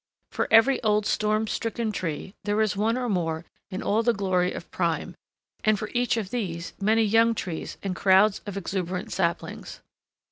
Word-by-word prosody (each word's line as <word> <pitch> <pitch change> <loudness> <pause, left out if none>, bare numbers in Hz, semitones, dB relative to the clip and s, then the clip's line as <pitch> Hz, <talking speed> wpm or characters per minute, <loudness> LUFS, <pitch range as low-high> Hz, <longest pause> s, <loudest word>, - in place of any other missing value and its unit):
For - - -1
every 225 +4 +5
old 210 -2 +2
storm 215 +1 +1
stricken 225 0 -2
tree, 185 -1 -4
there 205 +1 0
is 215 -2 +2
one 220 +4 +1
or 250 -1 -2
more 170 -5 -1 0.2
in 190 -1 -5
all 215 +2 +2
the 235 0 +2
glory 185 -2 +1
of - - -8
prime; 170 0 -1 0.5
and 215 -1 +3
for 215 - -5
each 245 -1 +1
of 205 -4 -3
these 180 -8 -3
many 220 +3 +3
young 225 +2 +4
trees 175 -6 -5
and 190 -2 -2
crowds 195 +2 +4
of 200 -1 -5
exuberant 185 -1 -3
saplings. 170 -2 -2
205 Hz, 175 wpm, -26 LUFS, 185-220 Hz, 0.5 s, every